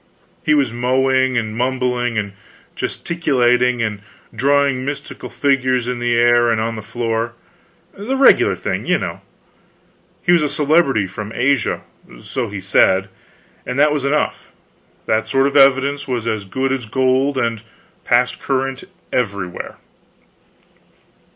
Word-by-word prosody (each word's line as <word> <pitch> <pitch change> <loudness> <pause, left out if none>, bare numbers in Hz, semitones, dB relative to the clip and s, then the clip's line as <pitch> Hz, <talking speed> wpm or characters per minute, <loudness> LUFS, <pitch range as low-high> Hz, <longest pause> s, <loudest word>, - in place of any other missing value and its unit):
He 150 - +3
was 135 -6 +1
mowing, 130 +1 +1
and 110 -2 -2
mumbling, 125 -1 -1
and 100 -2 -2 0.4
gesticulating, 125 -7 +1
and 105 -3 -3 0.3
drawing 140 -1 +2
mystical 140 +1 -6
figures 130 -3 +1
in 125 -1 -3
the 120 0 0
air 120 0 +4
and 115 -1 +1
on 115 +1 -2
the 110 - -6
floor, 115 +1 -3 0.6
the 235 +7 -3
regular 270 - +5
thing, - - -4
you - - +3
know. - - -5 1.0
He 175 - +2
was 175 -2 +5
a 150 - 0
celebrity 145 - +2
from 105 +3 -7
Asia 135 -1 +1 0.4
so 125 -5 -4
he 100 -1 -6
said, 95 0 +2 0.5
and 125 - -5
that 150 +1 +4
was 145 -3 -2
enough. 145 +2 -1 0.6
That 110 0 0
sort 135 +2 +2
of 140 - -1
evidence 140 +1 +4
was 120 -3 -2
as 110 -3 -2
good 130 +7 -2
as 130 -4 -3
gold, 130 +3 +1
and 115 -3 -1 0.4
passed 125 +1 +1
current 135 -1 -2 0.3
everywhere. 100 -7 -3
125 Hz, 140 wpm, -18 LUFS, 115-135 Hz, 1.0 s, regular